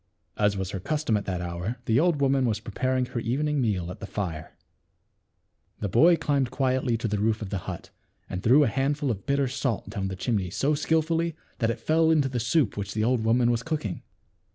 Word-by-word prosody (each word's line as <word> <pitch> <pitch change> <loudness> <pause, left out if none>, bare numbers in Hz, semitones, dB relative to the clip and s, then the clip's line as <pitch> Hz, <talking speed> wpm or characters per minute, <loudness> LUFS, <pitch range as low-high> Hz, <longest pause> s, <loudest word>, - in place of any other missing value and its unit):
As 105 -1 +1
was 95 -1 -3
her 95 - -4
custom 150 - 0
at 105 - -1
that 90 -2 -2
hour, 90 +7 -4
the 115 +1 +3
old 165 -3 +2
woman 135 -2 +3
was 110 -2 0
preparing 130 +4 -1
her 120 - -4
evening 140 +5 0
meal 95 -7 -1
at - - -9
the 105 - -7
fire. 85 -8 -5 1.2
The 105 - -2
boy 165 - +6
climbed 140 -5 0
quietly 130 -2 0
to 115 - -2
the 105 -1 -1
roof 110 +1 +1
of 105 -4 -6
the 100 - -1
hut, - - -7 0.4
and 90 - -4
threw 135 +9 +5
a - - +3
handful 140 +3 0
of 100 -3 -6
bitter 140 -1 +2
salt 130 -3 -2
down 100 -3 -2
the 95 - -4
chimney 100 -2 -1
so 140 - 0
skillfully 160 +2 +1 0.2
that 115 - +1
it 115 0 -2
fell 160 +3 +2
into 150 -4 +3
the 125 -2 -2
soup 120 +1 +1
which 100 +1 -4
the 110 - +1
old 120 0 +1
woman 120 +2 +3
was 115 -1 0
cooking. 140 - -3
120 Hz, 215 wpm, -26 LUFS, 105-140 Hz, 1.2 s, boy